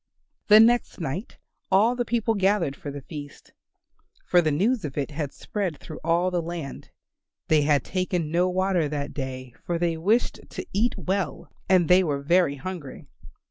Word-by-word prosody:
The 210 0 +8
next 235 0 +3
night 165 - -5 0.3
all 220 +6 +4
the 245 -1 -1
people 230 -1 0
gathered 195 -7 +1
for 145 - -7
the 140 -1 -7
feast, 145 -2 -10 0.7
for 175 - +4
the 160 - +1
news 205 - +1
of 145 -2 -6
it 145 +1 -2
had 145 -1 -4
spread 190 -4 -4
through 155 - -10
all 170 +3 +2
the 175 -1 0
land. 165 -4 -6 0.6
They 155 -1 +5
had 145 -1 +2
taken 180 -4 -2
no 175 +2 +2
water 185 -4 +1
that 145 0 -4
day, 130 -2 -6
for 175 - -1
they 170 -1 0
wished 210 +9 +1
to - - -6
eat 225 +5 +1
well, 190 0 -3 0.2
and 185 -3 +4
they 180 +2 +6
were 145 -4 -2
very 170 -1 +3
hungry. 160 -1 -7
175 Hz, 175 wpm, -25 LUFS, 150-190 Hz, 0.7 s, The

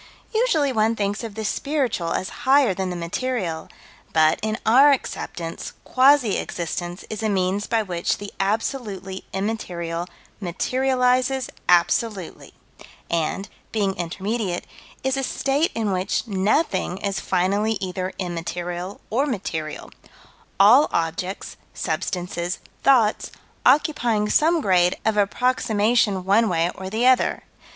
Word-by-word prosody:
Usually 385 - +2
one 220 0 +2
thinks 205 +1 -2
of 220 -3 -6
the 220 -1 -4
spiritual 255 - -1
as 190 - -2 0.2
higher 275 -6 +5
than 190 0 -3
the 180 - -4
material, 175 -1 -3 0.4
but, 160 +2 +4
in 215 +1 -1
our 265 +6 +7
acceptance, 170 -10 -4
quasi 260 -4 +4
existence 175 +1 -4
is 215 0 -4
a 220 - 0
means 195 +1 0
by 225 -1 +1
which 175 -4 -1
the 205 0 -8
absolutely 200 -2 -2
immaterial 180 -4 -3 0.3
materializes 255 +6 +1 0.2
absolutely, 180 +2 +1 0.6
and, 170 +4 -1 0.2
being 200 -3 0
intermediate, 190 +2 -3 0.4
is 265 +1 +1
a 270 - -1
state 275 +5 0
in 220 -3 0
which 185 +5 -1
nothing 195 - 0
is 200 0 -2
finally 200 +4 +1
either 185 0 -3
immaterial 175 +1 -4
or 270 +6 +1
material, 160 - -4 0.7
all 240 +9 +7
objects, 170 +3 -3 0.2
substances, 175 +1 -2 0.2
thoughts, 235 -6 +3 0.4
occupying 250 -7 +3
some 325 +5 +3
grade 180 -5 +3
of 220 -1 +2
approximation 210 -2 +1
one 215 +3 +4
way 170 0 +1
or 190 0 -7
the 225 +5 0
other. 255 -1 +3
205 Hz, 120 wpm, -23 LUFS, 180-245 Hz, 0.7 s, our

